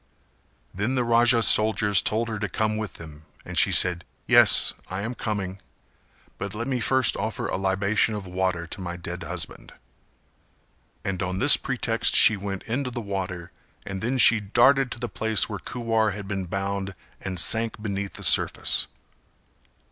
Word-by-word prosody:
Then 105 +8 -2
the 125 - 0
Raja's 115 0 +3
soldiers 105 -2 +3
told 115 +2 -1
her 110 -2 -5
to 105 -2 -4
come 110 +4 -2
with 110 -1 -5
them 80 -2 -12 0.2
and - - -8
she - - +4
said 90 -1 +1 0.2
"Yes, - - +6 0.2
I 95 +2 -5
am 120 +3 -4
coming, 100 -5 -5 0.8
but 100 +1 -5
let 120 +3 -4
me 130 -2 -2
first 130 +1 +1
offer 110 0 -4
a - - -3
libation 100 +3 0
of 105 -2 -7
water 90 -1 -2
to 95 +4 -8
my 85 -1 -6
dead 85 - -7
husband;" - - -6 1.3
and 95 -2 -3
on 90 0 -3
this 95 - +7
pretext - - 0
she 110 - +6
went 100 -1 -6
into 125 +3 -3
the 120 -1 -6
water 95 -4 -6 0.3
and 95 -1 -6
then 125 +4 -2
she 115 -3 +6
darted 125 +6 +2
to - - -12
the 120 - -4
place 110 -2 0
where 105 -3 -6
Kuwar 115 -1 -2
had 100 -2 -8
been 95 -2 -4
bound 100 +1 -4 0.3
and 95 -2 -3
sank 110 +6 +1
beneath 100 -2 -5
the - - -8
surface. - - +3
105 Hz, 170 wpm, -24 LUFS, 95-115 Hz, 1.3 s, this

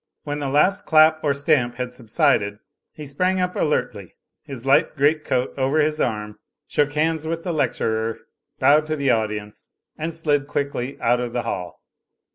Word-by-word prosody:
When 145 0 -4
the 140 -2 -2
last 150 +8 +2
clap 155 0 +5
or 145 - +2
stamp 140 -4 +1
had 125 0 -5
subsided, 115 -4 +1 0.3
he 150 - -9
sprang 180 +7 0
up 180 0 -1
alertly, 105 - -2 0.3
his 130 -3 -9
light 135 +3 +3
great 150 +2 +2
coat 125 -2 -1
over 135 +3 +1
his 155 0 +1
arm, 105 -2 -3 0.3
shook 145 0 0
hands 160 +1 0
with 165 +1 -3
the 175 - -2
lecturer, 115 -6 -1 0.4
bowed 150 +2 +4
to 155 - -1
the 140 -3 +1
audience 105 -2 -3 0.3
and 160 +2 -2
slid 150 -3 0
quickly 140 -2 -3
out 120 +1 +2
of 120 -1 -4
the 120 - -1
hall. 90 -1 -5
140 Hz, 170 wpm, -22 LUFS, 120-155 Hz, 0.4 s, clap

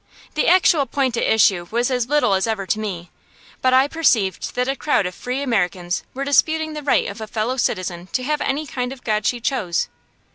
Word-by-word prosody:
The 305 - 0
actual 335 -5 +4
point 260 -1 0
at - - -1
issue 190 -5 +3
was 240 +3 0
as 250 -1 -1
little 295 -9 +3
as 190 +3 +1
ever 215 -3 -2
to 215 - -1
me, 180 -5 -5 0.5
but 255 - +3
I 260 +2 +5
perceived 230 - +1
that 250 0 0
a 270 - 0
crowd 275 -9 +1
of 180 - -3
Free 250 +8 -4
Americans 180 -7 -1
were 275 +1 -3
disputing 315 +2 +2
the 300 - -5
right 280 -2 +2
of 200 +3 -7
a 220 - -5
Fellow 220 +4 -2
Citizen 185 -7 -2
to 255 - 0
have 300 +3 -1
any 285 +3 -1
kind 250 -3 -4
of 265 -2 -10
God 215 -2 0
she 245 - 0
chose. 225 - -1
245 Hz, 215 wpm, -21 LUFS, 200-275 Hz, 0.5 s, I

